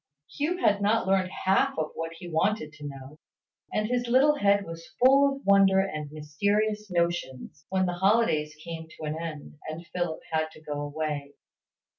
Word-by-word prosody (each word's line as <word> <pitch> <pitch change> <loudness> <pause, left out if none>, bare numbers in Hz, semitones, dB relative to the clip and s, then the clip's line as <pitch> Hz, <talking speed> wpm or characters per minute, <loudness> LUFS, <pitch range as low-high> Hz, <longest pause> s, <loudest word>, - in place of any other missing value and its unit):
Hugh 315 +5 0
had 205 - +2
not 215 +2 +2
learned 190 -1 +2
half 190 +1 +1
that 165 +1 -4
he 175 0 -9
wanted 165 -1 0
to 150 0 -8
know, 135 +2 -10 0.5
and 215 0 0
his 245 0 -1
little 265 +5 +5
head 200 -6 +2
was 165 0 -9
full 275 +2 +6
of 275 - -13
wonder 195 -1 +5
and 155 -7 -2
mysterious 205 +8 -1
notions, 170 -5 -2
when 190 0 +1
the 180 - -1
holidays 175 -6 +2
came 165 -1 -6
to - - -10
an 155 0 -2
end, 155 -2 -7
and 160 +2 -6
Philip 175 -3 -2
had 160 0 0
to - - -15
go 145 -1 -4
away. 145 -1 -4
175 Hz, 170 wpm, -27 LUFS, 155-205 Hz, 0.5 s, full